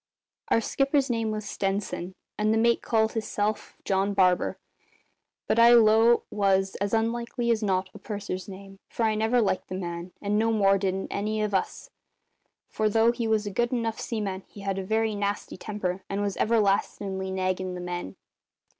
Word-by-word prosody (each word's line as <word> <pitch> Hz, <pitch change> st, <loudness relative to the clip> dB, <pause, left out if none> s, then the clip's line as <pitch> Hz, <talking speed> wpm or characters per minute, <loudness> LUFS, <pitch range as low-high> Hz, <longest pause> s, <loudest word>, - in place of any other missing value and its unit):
Our 230 Hz, -, +3 dB
skipper's 275 Hz, +2 st, +1 dB
name 225 Hz, -2 st, 0 dB
was 215 Hz, -1 st, -4 dB
Stenson, 195 Hz, -2 st, -3 dB, 0.2 s
and 215 Hz, 0 st, +1 dB
the 220 Hz, -, +2 dB
mate 235 Hz, +1 st, +3 dB
called 220 Hz, -1 st, +1 dB
hisself 215 Hz, -1 st, -2 dB
John 195 Hz, +1 st, +1 dB
Barber, 185 Hz, -2 st, +2 dB, 0.9 s
but 230 Hz, -, +2 dB
I 235 Hz, +1 st, +8 dB
'low 225 Hz, 0 st, +6 dB
it 240 Hz, -, +3 dB
was, 195 Hz, -2 st, +2 dB
as 200 Hz, +1 st, -1 dB
likely 235 Hz, +2 st, 0 dB
as 225 Hz, -1 st, +1 dB
not, 190 Hz, -2 st, 0 dB
a -, -, -11 dB
purser's 200 Hz, -3 st, -5 dB
name, 195 Hz, 0 st, -11 dB
for 235 Hz, -, -2 dB
I 220 Hz, -1 st, +3 dB
never 220 Hz, +3 st, +2 dB
liked 205 Hz, -4 st, 0 dB
the 185 Hz, -, -5 dB
man, 175 Hz, -1 st, -5 dB
and 210 Hz, +1 st, 0 dB
no 225 Hz, +1 st, +2 dB
more 195 Hz, -3 st, +3 dB
didn't 190 Hz, 0 st, -2 dB
any 215 Hz, +1 st, -1 dB
of 210 Hz, -1 st, -2 dB
us, 190 Hz, -, -2 dB, 0.8 s
for 215 Hz, 0 st, 0 dB
though 225 Hz, +2 st, +4 dB
he 235 Hz, -1 st, -3 dB
was 220 Hz, -1 st, +1 dB
a 205 Hz, -, -3 dB
good 240 Hz, +4 st, 0 dB
enough 230 Hz, -3 st, -1 dB
seaman 205 Hz, -5 st, -3 dB
he 205 Hz, -, -12 dB
had 195 Hz, -1 st, -2 dB
a -, -, -3 dB
very 220 Hz, +2 st, 0 dB
nasty 205 Hz, 0 st, -3 dB
temper 190 Hz, -3 st, -4 dB
and 195 Hz, -, -2 dB
was 200 Hz, -1 st, -2 dB
everlastin'ly 200 Hz, -3 st, 0 dB
naggin' 185 Hz, -1 st, -2 dB
the -, -, -6 dB
men. 175 Hz, -, -5 dB
205 Hz, 180 wpm, -27 LUFS, 190-225 Hz, 0.9 s, I